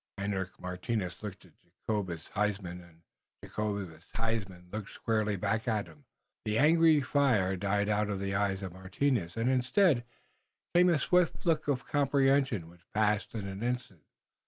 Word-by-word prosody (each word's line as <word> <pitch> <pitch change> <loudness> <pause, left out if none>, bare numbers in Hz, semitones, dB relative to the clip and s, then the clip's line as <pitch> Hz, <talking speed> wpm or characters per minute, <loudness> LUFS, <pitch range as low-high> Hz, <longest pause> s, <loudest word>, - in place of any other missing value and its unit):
Hendrik 100 -2 -3
Martinus 90 +1 -3
looked 100 -3 -7
at 90 - -19
Jacobus 90 -1 -4
Huysman 100 -4 -2
and 85 -1 -19 0.4
Jacobus 100 -6 -4
Huysman 105 -6 -3
looked 105 -2 -5
squarely 110 -2 0
back 105 +4 -1
at 110 -3 +1
him. 80 -4 -17 0.4
The 105 0 0
angry 160 +1 +5
fire 125 -9 +2
died 100 +2 0
out 105 0 +1
of 100 -2 -2
the 100 0 -2
eyes 100 -1 0
of 95 -2 -5
Martinus, 95 +1 -1
and 115 +2 +1
instead 130 - +3 0.7
came 180 +1 +6
a 170 - +4
swift 180 +6 +2
look 160 -3 +2
of 135 -3 0
comprehension 135 - +2
which 85 0 -19
passed 105 0 +1
in 105 -3 -3
an 95 +1 -6
instant. 125 -8 -3
105 Hz, 155 wpm, -31 LUFS, 95-125 Hz, 0.7 s, came